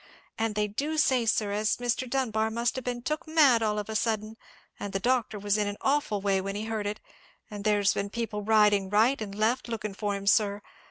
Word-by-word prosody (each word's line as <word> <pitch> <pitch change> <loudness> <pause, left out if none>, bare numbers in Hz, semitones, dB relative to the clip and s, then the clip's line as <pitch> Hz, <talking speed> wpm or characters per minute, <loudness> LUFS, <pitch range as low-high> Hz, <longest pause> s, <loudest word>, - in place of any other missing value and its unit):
And 225 -1 -2
they 210 0 +1
do 290 +10 -3
say, 260 -6 +2
sir, 215 -2 +1
as 210 +1 0
Mr. 245 +1 -2
Dunbar 225 -4 0
must 235 +2 -1
have 260 - -4
been 245 -1 -4
took 305 +4 -3
mad 290 -7 +5
all 210 -1 0
of 210 - -3
a 220 - -5
sudden, 215 0 -1 0.4
and 205 - -5
the 195 - 0
doctor 240 -1 0
was 205 +1 0
in 205 - +1
an 205 0 -4
awful 270 -8 0
way 195 -1 +1
when 195 +1 -4
he 210 +1 -3
heard 220 -2 -3
it; 210 +1 -4 0.5
and 205 -1 -6
there's 205 -2 +3
been 200 0 -3
people 220 -1 -4
riding 205 -2 +3
right 225 +6 +3
and 200 -2 -5
left 225 +5 0
lookin' 215 -3 -4
for 205 0 -2
him, 200 0 -6
sir. 205 0 +2
215 Hz, 225 wpm, -28 LUFS, 205-240 Hz, 0.5 s, mad